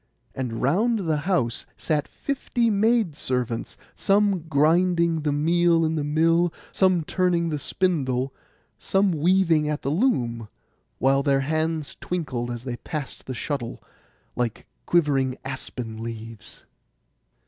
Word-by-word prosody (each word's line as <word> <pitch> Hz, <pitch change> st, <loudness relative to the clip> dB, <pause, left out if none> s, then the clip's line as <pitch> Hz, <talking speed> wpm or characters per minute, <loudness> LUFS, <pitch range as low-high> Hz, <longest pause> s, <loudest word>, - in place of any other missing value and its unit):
And 125 Hz, -3 st, -4 dB
round 205 Hz, -, +2 dB
the 155 Hz, -1 st, +2 dB
house 120 Hz, -11 st, 0 dB
sat 150 Hz, -3 st, -1 dB
fifty 240 Hz, -4 st, -1 dB
maid 215 Hz, -4 st, +2 dB
servants, 125 Hz, -4 st, -2 dB, 0.2 s
some 200 Hz, -1 st, +2 dB
grinding 170 Hz, +2 st, +3 dB
the 150 Hz, -1 st, 0 dB
meal 165 Hz, +3 st, +3 dB
in 160 Hz, -, 0 dB
the 155 Hz, -2 st, -1 dB
mill, 165 Hz, +3 st, +3 dB, 0.2 s
some 185 Hz, -3 st, +3 dB
turning 175 Hz, 0 st, +1 dB
the 150 Hz, -2 st, -2 dB
spindle, 135 Hz, -6 st, 0 dB, 0.5 s
some 195 Hz, 0 st, +2 dB
weaving 165 Hz, -1 st, +3 dB
at 150 Hz, 0 st, -3 dB
the 140 Hz, -, 0 dB
loom, 120 Hz, -, 0 dB, 0.5 s
while 135 Hz, +1 st, +3 dB
their 140 Hz, -1 st, +2 dB
hands 155 Hz, +1 st, -1 dB
twinkled 135 Hz, -9 st, -3 dB
as 120 Hz, -1 st, -5 dB
they 125 Hz, -2 st, -4 dB
passed 150 Hz, -1 st, -6 dB
the 130 Hz, -, -4 dB
shuttle, 120 Hz, -3 st, -4 dB, 0.6 s
like 120 Hz, -3 st, -2 dB, 0.2 s
quivering 135 Hz, -6 st, +2 dB
aspen 125 Hz, -4 st, -5 dB
leaves. 115 Hz, -1 st, -8 dB
155 Hz, 125 wpm, -24 LUFS, 130-175 Hz, 0.6 s, grinding